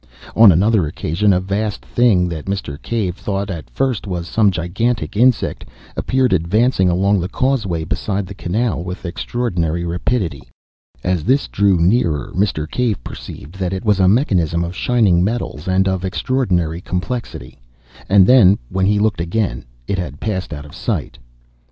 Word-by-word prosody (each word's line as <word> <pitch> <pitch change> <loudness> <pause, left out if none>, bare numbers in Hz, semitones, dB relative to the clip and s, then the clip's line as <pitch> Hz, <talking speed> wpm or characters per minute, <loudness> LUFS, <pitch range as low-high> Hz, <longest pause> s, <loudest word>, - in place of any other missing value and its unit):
On 110 -3 +8
another 95 0 +3
occasion 85 +7 0
a 90 - +3
vast 100 +3 -3
thing, 105 -8 +3
that 80 -3 -5
Mr. 95 -6 -4
Cave 105 -7 -2
thought 100 -1 -3
at 85 -4 -7
first 130 -6 -1
was 90 -3 -4
some 105 0 +3
gigantic 100 +7 -2
insect, 120 +1 +2 0.3
appeared 130 -3 +1
advancing 95 +3 +2
along 100 +3 +2
the 90 +1 -3
causeway 105 -11 0
beside 100 +4 -2
the 95 - -8
canal 100 0 -2
with 90 +1 -7
extraordinary 85 -3 -2
rapidity. 85 - -1 0.6
As 90 -3 0
this 135 +5 +2
drew 100 -2 +2
nearer 85 - +1
Mr. 90 -5 0
Cave 110 - -1
perceived 85 +9 -9
that 95 -1 -1
it 95 +5 -4
was 105 -2 +3
a 95 - +4
mechanism 90 - +2
of 85 +1 -5
shining 100 -8 +2
metals 95 - -3
and 95 +1 +2
of 95 -1 -1
extraordinary 90 -6 -1
complexity. 90 - -5 0.5
And 95 -1 +6
then, 105 -6 +6
when 95 0 0
he 105 0 +3
looked 105 -4 +1
again, 85 - -2 0.2
it 100 - -1
had 75 -5 -5
passed 95 -4 -3
out 75 0 -6
of 75 - -13
sight. 95 -3 -3
95 Hz, 160 wpm, -18 LUFS, 85-110 Hz, 0.6 s, On